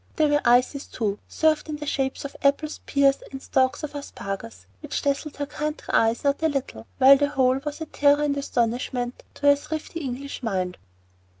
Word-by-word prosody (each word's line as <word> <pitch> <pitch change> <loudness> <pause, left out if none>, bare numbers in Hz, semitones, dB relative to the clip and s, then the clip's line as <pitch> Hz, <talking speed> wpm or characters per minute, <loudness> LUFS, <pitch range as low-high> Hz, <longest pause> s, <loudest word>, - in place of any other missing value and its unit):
There 310 -1 +3
were 290 0 +3
ices 250 +4 +3
too, 210 -3 -2
served 310 -1 +1
in 305 - -2
the 295 0 -6
shapes 270 -1 -2
of 280 - -7
apples, 290 +2 +1
pears, 275 -1 +3
and 270 - -6
stalks 260 +2 +1
of 300 - -5
asparagus, 195 - -7
which - - -4
dazzled 280 +1 -1
her 290 - -2
country 300 +1 -5
eyes 225 +1 +3
not 280 +1 +1
a 320 - +3
little, 260 - -4
while 275 +1 +8
the 285 +1 +1
whole 260 -2 +2
was 295 +1 -5
a - - -2
terror 290 -1 +3
and 290 -1 +1
astonishment 245 -2 -1
to - - -16
her 285 0 +7
thrifty 310 +3 -5
English 275 -1 -5
mind. 185 -6 -2
280 Hz, 190 wpm, -25 LUFS, 245-295 Hz, -, while